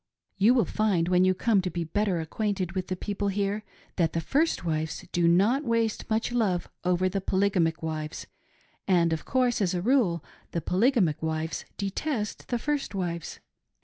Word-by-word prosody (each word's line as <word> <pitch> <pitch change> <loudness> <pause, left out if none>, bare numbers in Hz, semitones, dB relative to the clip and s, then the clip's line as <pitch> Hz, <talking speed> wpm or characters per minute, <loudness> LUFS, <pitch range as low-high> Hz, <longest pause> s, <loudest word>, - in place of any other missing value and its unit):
You 225 +6 +5
will 235 -6 +3
find, 190 -4 +1
when 180 0 +4
you 185 0 +3
come 210 0 +2
to 185 - -2
be 175 -1 -3
better 190 +2 0
acquainted 190 +2 -2
with 185 0 -3
the 185 - -2
people 205 +2 -3
here, 200 +1 -1 0.3
that 165 -3 +2
the 165 - 0
first 295 - 0
wives 160 -1 -2
do 175 -1 +2
not 205 - +4
waste 230 -3 0
much 220 +2 0
love 205 -7 0 0.2
over 180 +1 +2
the 195 +1 -2
poly 195 +2 +1
gamic 165 -4 +1
wives; 155 -1 -4 0.6
and, 170 -3 +3
of 160 - -4
course, 250 -3 +1
as 185 -2 +1
a 175 - -1
rule, 210 - +2 0.3
the 170 - 0
polygamic 185 - +2
wives 160 0 -2
detest 210 +3 -3
the 240 - 0
first 290 -2 -2
wives. 170 -3 -4
190 Hz, 180 wpm, -27 LUFS, 170-220 Hz, 0.6 s, You